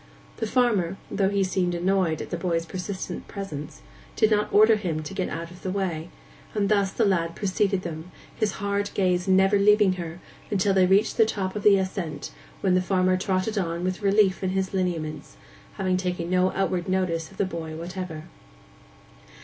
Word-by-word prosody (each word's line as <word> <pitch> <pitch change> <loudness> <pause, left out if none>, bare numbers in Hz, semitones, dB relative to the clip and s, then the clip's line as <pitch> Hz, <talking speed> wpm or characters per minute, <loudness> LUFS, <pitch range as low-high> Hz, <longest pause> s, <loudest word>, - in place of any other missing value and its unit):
The 225 - -2
farmer, 210 -7 +1
though 195 -1 +2
he 200 -1 +1
seemed 185 -2 0
annoyed 180 -2 +1
at - - -11
the - - 0
boy's 170 -1 -1
persistent 185 +2 -5
presence, 150 - -7 0.3
did 220 - +3
not 210 0 +2
order 215 +2 +6
him 170 -7 -3
to 175 - -7
get 190 -1 -2
out 170 +1 -5
of 180 - -13
the 185 - -3
way; 180 -4 -2 0.5
and 200 -2 +1
thus 200 -2 +2
the 225 - +1
lad 170 -4 +1
preceded 195 -1 0
them, 165 0 -6 0.3
his 210 -3 0
hard 200 0 -1
gaze 180 -1 +1
never 190 +1 +4
leaving 210 -1 +5
her, 170 +1 -7 0.4
till 195 +1 +2
they 185 -1 +4
reached 200 +4 +3
the 225 - +6
top 190 -3 -3
of 210 - -3
the 200 -1 +6
ascent, 185 -6 -3 0.3
when 190 -2 +2
the 185 - +3
farmer 185 0 +2
trotted 190 +3 0
on 170 -1 -2
with 185 +2 -2
relief 200 -1 +3
in 190 - +1
his 190 0 -1
lineaments—having 180 +2 -3
taken 180 -2 -3
no 185 0 +3
outward 185 -2 -1
notice 175 -4 0
of 195 - -17
the 200 - +1
boy 165 -3 -5
whatever. 170 -1 -6
185 Hz, 180 wpm, -25 LUFS, 175-200 Hz, 0.5 s, order